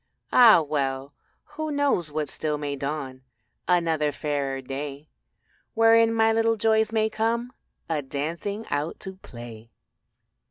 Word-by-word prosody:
Ah 230 Hz, -8 st, +8 dB
well, 140 Hz, -2 st, -2 dB, 0.3 s
who 310 Hz, +1 st, -6 dB
knows 285 Hz, -, +1 dB
but 150 Hz, 0 st, -2 dB
still 150 Hz, -1 st, -2 dB
may 145 Hz, -1 st, -3 dB
dawn 140 Hz, -2 st, -5 dB, 0.5 s
Another 165 Hz, -4 st, +2 dB
fairer 140 Hz, -2 st, -2 dB
day 140 Hz, +2 st, -6 dB, 0.7 s
Wherein 225 Hz, 0 st, +5 dB
my 225 Hz, 0 st, +3 dB
little 225 Hz, 0 st, +2 dB
joys 220 Hz, 0 st, +2 dB
may 220 Hz, -1 st, +2 dB
come 230 Hz, +3 st, -1 dB, 0.3 s
A 160 Hz, -3 st, -1 dB
dancing 165 Hz, +10 st, -4 dB
out 145 Hz, +3 st, -2 dB
to 190 Hz, -1 st, -6 dB
play. 120 Hz, -, -11 dB
160 Hz, 125 wpm, -25 LUFS, 140-225 Hz, 0.7 s, Ah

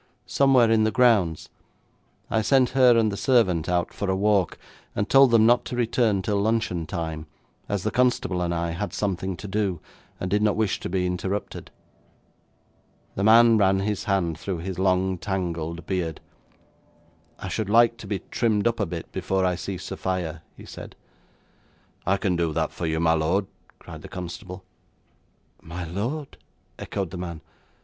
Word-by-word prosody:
'Somewhere 130 Hz, -4 st, +4 dB
in 110 Hz, -1 st, +4 dB
the 110 Hz, -, +3 dB
grounds. 110 Hz, -10 st, +2 dB, 0.8 s
I 110 Hz, -, +2 dB
sent 130 Hz, +2 st, +3 dB
her 125 Hz, -3 st, +5 dB
and 110 Hz, -2 st, +2 dB
the -, -, -4 dB
servant 100 Hz, -, +2 dB
out 90 Hz, -1 st, 0 dB
for 100 Hz, -, -3 dB
a 95 Hz, -, +2 dB
walk, 100 Hz, -2 st, +1 dB, 0.4 s
and 100 Hz, -, -1 dB
told 135 Hz, -1 st, +6 dB
them 115 Hz, -2 st, +5 dB
not 120 Hz, +1 st, +4 dB
to -, -, -5 dB
return 115 Hz, -4 st, +1 dB
till 100 Hz, 0 st, 0 dB
luncheon 110 Hz, -6 st, 0 dB
time, 80 Hz, -3 st, -4 dB, 0.4 s
as 100 Hz, -2 st, -1 dB
the -, -, -1 dB
constable 125 Hz, -7 st, +1 dB
and 85 Hz, -1 st, -1 dB
I 85 Hz, 0 st, -1 dB
had 100 Hz, +5 st, -4 dB
something 95 Hz, -2 st, -2 dB
to 105 Hz, -, -8 dB
do, 95 Hz, -3 st, -1 dB, 0.4 s
and 90 Hz, -, -4 dB
did 105 Hz, +1 st, +2 dB
not 105 Hz, -1 st, +2 dB
wish 110 Hz, -3 st, 0 dB
to -, -, -5 dB
be 90 Hz, 0 st, 0 dB
interrupted.' 95 Hz, +3 st, -4 dB, 1.4 s
The 100 Hz, -, -3 dB
man 115 Hz, +1 st, +6 dB
ran 95 Hz, -1 st, +3 dB
his 105 Hz, 0 st, -2 dB
hand 85 Hz, -5 st, 0 dB
through 95 Hz, 0 st, -3 dB
his 90 Hz, +2 st, -5 dB
long 95 Hz, -1 st, +1 dB
tangled 85 Hz, -4 st, -3 dB
beard. 90 Hz, -5 st, -2 dB, 1.2 s
'I 95 Hz, -, -6 dB
should 100 Hz, +4 st, -3 dB
like 115 Hz, +1 st, +4 dB
to -, -, -10 dB
be 100 Hz, -3 st, -3 dB
trimmed 110 Hz, -4 st, +1 dB
up 115 Hz, 0 st, -1 dB
a 100 Hz, -, 0 dB
bit 85 Hz, -1 st, -7 dB
before 95 Hz, -1 st, -1 dB
I 90 Hz, -, +2 dB
see 95 Hz, +2 st, -5 dB
Sophia,' 90 Hz, -3 st, -4 dB, 0.2 s
he -, -, -12 dB
said. -, -, -10 dB, 1.1 s
'I 95 Hz, +1 st, +3 dB
can 95 Hz, -3 st, 0 dB
do 85 Hz, -2 st, 0 dB
that -, -, -1 dB
for 85 Hz, -, -4 dB
you, 80 Hz, 0 st, -1 dB
my 80 Hz, 0 st, +3 dB
lord,' 85 Hz, +5 st, +1 dB, 0.3 s
cried -, -, -11 dB
the -, -, -10 dB
constable. 90 Hz, +1 st, -8 dB, 1.0 s
'My 85 Hz, +2 st, -7 dB
lord?' 115 Hz, -, -4 dB, 0.4 s
echoed 95 Hz, -4 st, -4 dB
the 90 Hz, -, -6 dB
man. 85 Hz, -3 st, -6 dB
95 Hz, 170 wpm, -25 LUFS, 90-110 Hz, 1.4 s, told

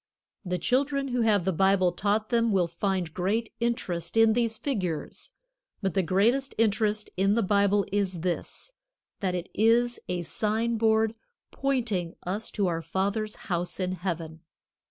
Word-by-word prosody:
The 180 Hz, -2 st, -2 dB
children 275 Hz, -, 0 dB
who 245 Hz, -1 st, 0 dB
have 210 Hz, -5 st, +3 dB
the 190 Hz, -, +1 dB
Bible 190 Hz, +1 st, +3 dB
taught 210 Hz, +3 st, 0 dB
them 230 Hz, -2 st, +2 dB
will 185 Hz, -4 st, +2 dB
find 175 Hz, -1 st, -2 dB
great 215 Hz, +5 st, -1 dB
interest 230 Hz, -6 st, -2 dB
in 225 Hz, -1 st, +6 dB
these 230 Hz, -1 st, +1 dB
figures. 185 Hz, -, -4 dB, 0.5 s
But 195 Hz, -3 st, -1 dB
the 195 Hz, -, +2 dB
greatest 225 Hz, +10 st, +1 dB
interest 215 Hz, -1 st, +1 dB
in 195 Hz, +2 st, +3 dB
the 230 Hz, -, +2 dB
Bible 200 Hz, 0 st, +3 dB
is 190 Hz, -4 st, 0 dB
this, 180 Hz, -, -3 dB, 0.5 s
that 185 Hz, -2 st, -1 dB
it 180 Hz, 0 st, -4 dB
is 235 Hz, +3 st, +3 dB
a 180 Hz, -1 st, -1 dB
sign 220 Hz, +5 st, 0 dB
board 220 Hz, 0 st, +3 dB, 0.4 s
pointing 230 Hz, -11 st, -1 dB
us 200 Hz, +5 st, -3 dB
to 200 Hz, -, -1 dB
our 165 Hz, -2 st, -1 dB
Father's 200 Hz, +5 st, -2 dB
house 175 Hz, 0 st, -2 dB
in 185 Hz, -1 st, -1 dB
Heaven. 165 Hz, -3 st, -4 dB
200 Hz, 155 wpm, -27 LUFS, 180-225 Hz, 0.5 s, in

